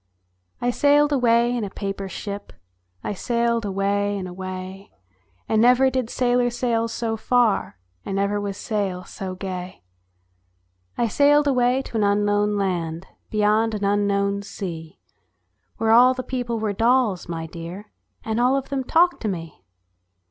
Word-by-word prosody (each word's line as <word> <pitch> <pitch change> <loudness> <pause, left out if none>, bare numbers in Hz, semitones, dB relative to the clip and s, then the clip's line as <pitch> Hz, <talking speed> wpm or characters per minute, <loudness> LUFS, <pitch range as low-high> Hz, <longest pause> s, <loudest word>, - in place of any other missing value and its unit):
I 245 - 0
SAILED 290 +3 +3
away 240 -2 +3
in 235 - -2
a 200 - -3
paper 195 0 -5
ship, 200 +2 -7 0.5
I - - -2
sailed 235 +2 0
away 200 +1 0
and 185 -2 -5
away, 185 +1 -7 0.6
And 220 0 +2
never 250 +2 +5
did 255 -3 -1
sailor 245 -1 +1
sail 235 -1 0
so 225 0 -2
far, 230 - +1 0.3
And 195 - -4
never 200 +1 0
was 200 -1 -4
sail 195 -4 -2
so 185 0 -7
gay. 185 - -6 1.1
I 235 - +2
sailed 290 +5 +4
away 255 0 +2
to 230 - -5
an 215 - +2
unknown 205 0 +2
land, 175 -3 -2 0.2
Beyond 215 +1 +2
an 205 - -4
unknown 200 0 +1
sea, 170 -6 -7 0.8
Where 225 0 +1
all 250 +3 +6
the 255 - -4
people 245 -3 -3
were 215 -2 -1
dolls, 225 -4 +1
my 165 -1 -4
dear, 170 +5 -9 0.3
And 220 +1 -1
all 255 +3 +3
of 275 - -4
them 275 -2 -2
talked 345 +6 +3
to 220 - -2
me. 165 - -6
210 Hz, 150 wpm, -23 LUFS, 195-245 Hz, 1.1 s, all